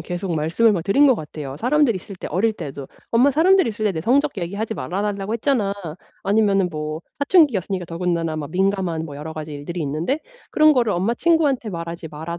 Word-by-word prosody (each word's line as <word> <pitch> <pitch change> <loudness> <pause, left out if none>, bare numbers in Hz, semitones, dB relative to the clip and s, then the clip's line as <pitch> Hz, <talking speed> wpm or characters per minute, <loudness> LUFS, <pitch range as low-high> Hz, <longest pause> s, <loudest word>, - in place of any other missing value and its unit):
계속 175 +2 -4
말씀을 165 +9 +2
뭐 180 - 0
드린 275 - +4
것 260 - +5
같아요. 150 -4 -7
사람들 265 - +3
있을 185 +1 -8
때 - - -7
어릴 210 +6 +1
때도. 140 -4 -7 0.2
"엄마 250 +5 +4
사람들이 350 +1 +4
있을 215 0 -4
때 205 - +2
내 160 - -3
성적 270 - +1
얘기하지 200 +6 -3
말아 175 +10 -3
달라고 205 +1 -2
했잖아." 225 -5 0 0.5
아니면은 195 -3 +2
뭐 155 +1 -5 0.2
사춘기였으니까 230 - +2
더군다나 170 -1 -2
뭐 150 -2 -4
민감한 185 -3 0
뭐 145 -3 -8
여러 160 +2 -7
가지 155 -1 -6
일들이 155 +5 -6
있는데 160 - -1 0.3
그런 310 0 +5
거를 235 -7 +2
엄마 195 +7 0
친구한테 290 -5 +2
말하지 170 -2 -6
말아 160 +3 -6
195 Hz, 445 characters per minute, -21 LUFS, 160-230 Hz, 0.5 s, 것